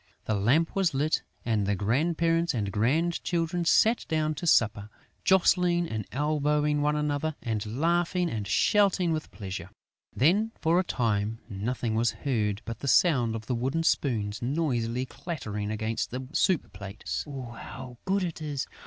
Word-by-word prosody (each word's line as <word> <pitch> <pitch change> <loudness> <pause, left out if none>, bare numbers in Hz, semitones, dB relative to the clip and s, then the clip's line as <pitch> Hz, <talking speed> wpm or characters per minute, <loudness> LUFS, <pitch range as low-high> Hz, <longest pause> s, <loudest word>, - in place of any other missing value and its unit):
The 110 - 0
lamp 125 +12 +2
was 185 -7 +1
lit 150 +3 +1 0.2
and 110 -4 +1
the 100 - +1
grandparents 165 - +1
and 100 -4 -1
grandchildren 165 - 0
sat 225 +7 +4
down 155 -1 0
to 170 +3 -5
supper, 105 -7 +3 0.3
jostling 180 -2 +3
and 110 -6 -4
elbowing 150 +1 +1
one 150 +1 +2
another 150 +1 -1
and 110 -3 -1 0.2
laughing 175 +2 +1
and 110 -9 -3
shouting 190 - +3
with 155 -1 -4
pleasure. 95 -3 -7 0.5
Then, 205 - +3
for 165 +2 +3
a - - +2
time, 110 - -1
nothing 115 +2 -2
was 115 +1 +2
heard 110 -6 0
but 115 -1 -6
the 140 - -5
sound 125 -8 +4
of 110 -1 -6
the 125 - -2
wooden 130 +7 -1
spoons 110 -10 0
noisily 125 -3 -1
clattering 120 - -5
against 110 +1 -2
the 130 +1 -5
soup 180 -2 +1
plates. 100 +1 -5
"How 125 -2 -8
good 195 0 +1
it 170 -3 -4
is! 145 -3 -3
135 Hz, 155 wpm, -28 LUFS, 110-165 Hz, 0.5 s, sat